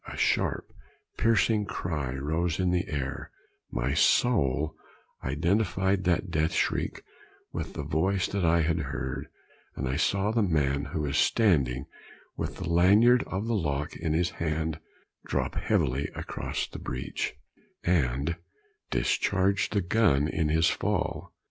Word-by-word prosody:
A - - -7
sharp, - - 0 0.4
piercing 110 -1 +2
cry 75 -9 -3
rose 80 +5 -1
in 90 -1 +2
the 90 0 0
air 70 -3 -4 0.4
my - - -1
soul 75 - +2 0.5
identified 95 +6 +1
that 90 +1 +1
death 80 0 +1
shriek - - -1 0.5
with - - -4
the 75 - -4
voice 90 +6 +1
that 100 -2 -1
I 85 0 +4
had 80 +1 +1
heard, 65 -3 -4 0.5
and 65 - -3
I 65 +2 -1
saw 100 +6 +1
the 115 0 +2
man 75 -7 +1
who 80 - -3
was 75 0 0
standing 70 - +2 0.5
with - - -4
the - - -5
lanyard 100 +9 +5
of 95 +3 -3
the 115 - -1
lock 75 -7 -1
in 80 -3 -2
his 85 +2 +1
hand 80 0 -2 0.5
drop - - -1
heavily 65 +3 0
across - - -3
the - - -9
breech, 65 0 -4 0.5
and 75 -1 +1 0.5
discharge 100 0 +1
the 105 - +1
gun 85 -7 +3
in 80 -1 0
his 80 +1 +3
fall. - - -1
80 Hz, 140 wpm, -28 LUFS, 70-95 Hz, 0.5 s, lanyard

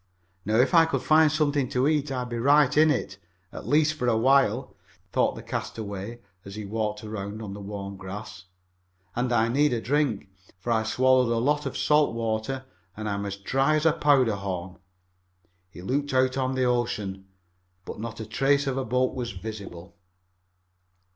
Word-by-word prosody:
"Now 110 +2 0
if 125 +3 +3
I 165 -1 +7
could 160 - -2
find 155 -1 +5
something 145 -4 +1
to 130 +2 +1
eat 150 -2 0
I'd 125 -2 -3
be 120 -1 -3
right 140 +2 +4
in 155 +1 +6
it 120 -8 -2 0.3
at - - -8
least 155 +1 +3
for 125 -5 -3
a 115 -2 +3
while," 130 0 +2 0.4
thought - - +1
the - - -9
castaway 105 +2 -5 0.2
as 100 0 -9
he 105 -1 -6
walked 105 +1 -3
around 105 -1 -6
on 105 -3 -6
the 100 - -8
warm 100 -1 -6
grass. 100 +2 -8 0.7
"And 125 +1 -1
I 115 -1 +3
need 145 +4 +2
a 120 - 0
drink, 135 -5 0 0.3
for 120 - -3
I 110 -1 +3
swallowed 130 +2 +3
a 115 - +1
lot 145 +4 +1
of 135 - -5
salt 150 -5 +3
water 115 +3 -2 0.3
and 110 0 -4
I'm 100 -1 -2
as 100 - -4
dry 135 +9 +1
as 155 +1 0
a 160 - +5
powder 130 -8 +3
horn." 95 -2 -5 0.9
He 90 - -12
looked 140 +5 -1
out 130 0 +3
on 130 0 -1
the 130 - +1
ocean, 105 -6 -1 0.6
but - - -7
not 115 +1 -6
a 110 - -5
trace 140 +6 +1
of 135 -1 -2
a 135 - 0
boat 125 +2 0
was 120 -4 -4
visible. 95 -3 -8
120 Hz, 185 wpm, -26 LUFS, 105-135 Hz, 0.9 s, I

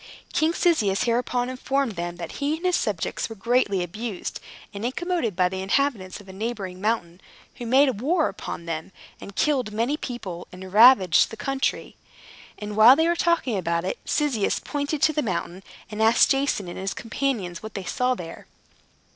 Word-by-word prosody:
King 320 +1 +2
Cyzicus 220 - +2
hereupon 245 +1 0
informed 265 0 -1
them 175 -2 -4
that 170 -1 -7
he 295 +3 0
and 345 - -8
his 360 -1 +3
subjects 205 -2 -2
were 225 - -7
greatly 210 -3 +1
abused 210 +3 -5 0.3
and 200 +1 -6
incommoded 265 - -1
by 180 0 +3
the 190 +1 -4
inhabitants 200 -2 0
of 205 - -15
a 190 - -10
neighboring 195 -3 -5
mountain, 190 -5 -1 0.4
who 240 -2 -6
made 260 -3 +3
war 315 +4 +2
upon 190 -3 -6
them, 165 +2 -5 0.3
and 200 - -10
killed 260 -6 +1
many 235 +7 0
people, 195 - -6
and 185 0 -10
ravaged 210 -6 +7
the 220 - -9
country. 270 0 -2 0.6
And 210 0 -6
while 225 +5 +8
they 320 +3 +2
were 345 - +2
talking 330 - +1
about 170 0 -1
it, 190 - -3
Cyzicus 275 -9 0
pointed 290 0 -3
to 310 - +4
the 300 - 0
mountain, 180 -4 -3 0.3
and 210 +1 -4
asked 225 +1 +5
Jason 270 -8 0
and 175 - -7
his 195 +1 -3
companions 225 -8 -3
what 220 -1 -9
they 195 - -4
saw 250 +7 0
there. 165 -5 -9
220 Hz, 180 wpm, -24 LUFS, 190-270 Hz, 0.6 s, while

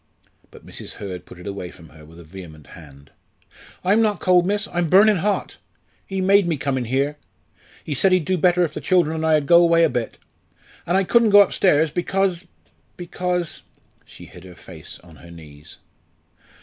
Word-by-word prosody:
But - - -17
Mrs. - - -8
Hurd 90 -3 -8
put - - -13
it 90 - -13
away 100 -3 -6
from 85 -3 -16
her 80 0 -17
with 80 +2 -16
a 85 - -13
vehement 80 -3 -13
hand. 70 -4 -16 0.7
"I'm 205 +5 +2
not 210 -4 0
cold, 180 -1 +2
miss 205 +1 -1
I'm 175 -2 -1
burning 205 +3 +5
hot. 200 +4 -2 0.5
He 190 -1 -4
made 195 0 +3
me 165 -3 -1
come 140 0 -2
in 125 -2 -3
here. 135 +5 -2 0.7
He 150 - -5
said 185 +8 +2
he'd 185 -4 +2
do 185 - 0
better 180 0 +2
if 165 - -3
the - - -6
children 175 -4 +1
and 160 - -4
I 160 -1 +3
ud 150 -2 0
go 170 +4 +6
away 170 -1 +3
a 165 - +3
bit. 120 -4 -4 0.7
An' 175 - 0
I 195 - +3
couldn't 230 +3 +3
go 205 0 +7
upstairs, 160 -6 +2
because 185 +1 -1 0.5
because 180 -1 -4 0.2
" - - -38
she - - -15
hid 90 - -15
her 90 -1 -13
face 80 -3 -11
on 85 -3 -17
her 85 - -15
knees. 75 -2 -13
160 Hz, 200 wpm, -21 LUFS, -, 0.7 s, go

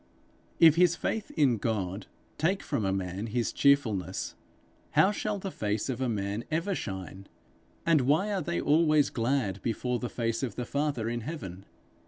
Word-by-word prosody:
If 165 -1 +7
his 175 -1 +5
faith 220 +3 -2
in 135 -6 +4
God 100 -3 -2 0.3
take 185 +5 +1
from 105 - -1
a 95 - +1
man 95 +2 -3
his 120 +1 -1
cheerfulness, 110 -10 +1 0.6
how 190 - +5
shall 210 0 -2
the 195 0 -5
face 105 -1 -2
of 130 0 -3
a 130 - +1
man 100 0 -2
ever 165 +6 0
shine? 95 - -6 0.6
And 165 -4 +4
why 155 +11 +2
are 195 - 0
they 170 0 -2
always 155 -1 +3
glad 115 -5 0
before 120 +2 -1
the 125 - -3
face 115 -1 -2
of 125 -6 -3
the 125 - -3
Father 140 -4 -1
in 120 +1 -2
heaven? 100 - -7
125 Hz, 170 wpm, -29 LUFS, 105-155 Hz, 0.6 s, If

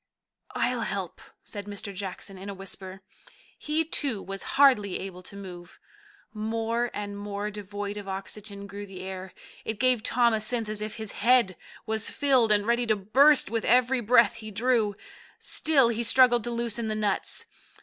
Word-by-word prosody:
"I'll - - +1
help," - - -4 0.2
said 205 -1 -7
Mr. 205 0 -5
Jackson 195 0 -6
in 190 +2 -8
a 200 - -5
whisper. 190 0 -8 0.6
He, 310 +2 0
too, 280 -8 -1
was 195 0 -6 0.2
hardly 250 -9 +5
able 185 -1 -7
to 185 - -12
move. 180 -3 -10 0.6
More 225 +2 -1
and 205 -1 -5
more 205 +1 -4
devoid 205 0 -5
of 205 -1 -7
oxygen 200 +1 -6
grew 200 0 -8
the 190 -1 -9
air. 190 0 -6 0.3
It 220 -2 -4
gave 255 -3 +3
Tom 235 +1 +3
a 220 - 0
sense 225 0 0
as 215 0 -2
if 215 0 -4
his 220 -2 -5
head 230 -4 +3 0.3
was 220 0 +1
filled, 260 -5 +3
and 205 -1 +4
ready 235 +1 +1
to 215 - +3
burst 260 +10 +4
with 230 -1 -1
every 250 +1 +3
breath 235 -1 +4
he 215 -1 -8
drew. 220 -1 +1 0.4
Still 275 -7 +3
he 235 0 -1
struggled 240 0 +5
to - - -2
loosen 235 -1 -2
the 215 - -1
nuts. 210 -2 -1
215 Hz, 170 wpm, -27 LUFS, 200-235 Hz, 0.6 s, hardly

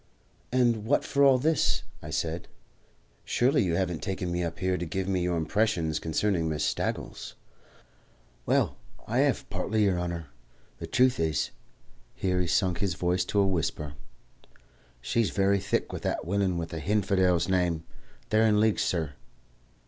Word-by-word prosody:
"And 120 -4 +2
what 145 +5 +2
for 140 - +2
all 135 -2 +7
this?" 155 +4 +1 0.2
I - - -8
said. 85 +1 -2 0.8
"Surely 130 +4 +2
you 85 -3 0
haven't 90 -3 -1
taken 95 -2 -3
me 90 0 -1
up 85 0 -4
here 95 0 0
to 90 - -3
give 95 +3 -2
me 95 -2 0
your 90 -1 0
impressions 85 -2 0
concerning 85 0 0
Miss 75 -1 -1
Staggles?" - - -3 1.1
"Well, - - +2 0.3
I - - 0
hev - - +1
partly, 110 +1 0
yer 95 -3 +2
honour. 85 -3 -4 0.5
The - - -6
truth 125 -3 +3
is" 80 -3 0 0.6
here 90 -1 0
he 90 - -1
sunk 90 0 +1
his 95 -4 0
voice 90 +1 +1
to 100 - +2
a - - +3
whisper 80 -5 -2 1.1
"she's 105 - +1
very 100 0 +2
thick 100 - -1
with - - -4
that - - -2
willain 95 0 0
with 85 0 -4
a 80 - -3
hinfidel's 95 -4 +2
name. 90 -4 +1 0.5
They're 110 +1 +4
in 105 -1 +3
league, 110 -1 +3
sur." 80 -5 -1
90 Hz, 160 wpm, -28 LUFS, 85-105 Hz, 1.1 s, all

